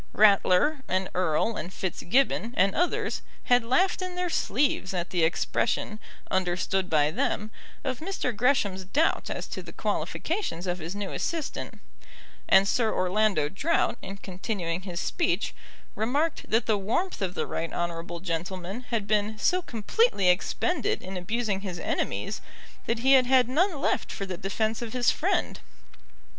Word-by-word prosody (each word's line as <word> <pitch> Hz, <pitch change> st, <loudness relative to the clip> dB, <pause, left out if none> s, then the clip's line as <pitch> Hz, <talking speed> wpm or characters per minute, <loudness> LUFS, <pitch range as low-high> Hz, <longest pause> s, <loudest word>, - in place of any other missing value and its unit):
Ratler, 210 Hz, +7 st, +4 dB
and 185 Hz, 0 st, 0 dB
Erle, 180 Hz, +5 st, +1 dB
and 175 Hz, +4 st, -5 dB
Fitzgibbon, 230 Hz, +6 st, 0 dB
and 195 Hz, +1 st, +4 dB
others 350 Hz, +2 st, 0 dB, 0.2 s
had 245 Hz, -1 st, +4 dB
laughed 360 Hz, +12 st, +2 dB
in 365 Hz, -1 st, -4 dB
their 360 Hz, -1 st, -1 dB
sleeves 240 Hz, -, +1 dB
at 175 Hz, 0 st, -2 dB
the 175 Hz, -3 st, +2 dB
expression, 215 Hz, +5 st, 0 dB, 0.3 s
understood 185 Hz, +1 st, 0 dB
by 150 Hz, -1 st, +3 dB
them, 210 Hz, +6 st, -1 dB, 0.3 s
of 260 Hz, -3 st, -2 dB
Mr. 320 Hz, -, -2 dB
Gresham's 205 Hz, -6 st, +2 dB
doubt 290 Hz, -, +1 dB
as -, -, -3 dB
to -, -, -5 dB
the -, -, -10 dB
qualifications 325 Hz, -, -2 dB
of 180 Hz, 0 st, -2 dB
his 170 Hz, +3 st, -5 dB
new 205 Hz, -1 st, -4 dB
assistant, 325 Hz, -3 st, -3 dB, 0.7 s
and 195 Hz, +1 st, +6 dB
Sir 225 Hz, 0 st, +2 dB
Orlando 185 Hz, -4 st, +2 dB
Drought, 260 Hz, -, 0 dB
in 195 Hz, -, -7 dB
continuing 185 Hz, -3 st, -3 dB
his 180 Hz, -3 st, -5 dB
speech, 350 Hz, -, 0 dB, 0.4 s
remarked 285 Hz, +9 st, -1 dB
that 225 Hz, +1 st, +2 dB
the 215 Hz, -3 st, +2 dB
warmth 295 Hz, -, -1 dB
of 185 Hz, -2 st, -1 dB
the -, -, -1 dB
right 165 Hz, -, -3 dB
honourable 170 Hz, 0 st, -3 dB
gentleman 185 Hz, +4 st, -4 dB
had 230 Hz, -4 st, 0 dB
been 210 Hz, +1 st, +1 dB
so 360 Hz, -, +2 dB
completely 230 Hz, -, +2 dB
expended 355 Hz, -, +1 dB
in 190 Hz, -, -6 dB
abusing 200 Hz, +2 st, -1 dB
his 185 Hz, -3 st, -5 dB
enemies -, -, -2 dB, 0.5 s
that 230 Hz, -, +1 dB
he 265 Hz, +2 st, +4 dB
had 255 Hz, -2 st, +6 dB
had 255 Hz, -2 st, +5 dB
none 315 Hz, +5 st, +1 dB
left -, -, 0 dB
for 195 Hz, -, -4 dB
the 185 Hz, -1 st, -4 dB
defence 215 Hz, +5 st, -1 dB
of 230 Hz, -2 st, -5 dB
his 245 Hz, -2 st, +3 dB
friend. -, -, 0 dB
210 Hz, 155 wpm, -27 LUFS, 185-255 Hz, 0.7 s, and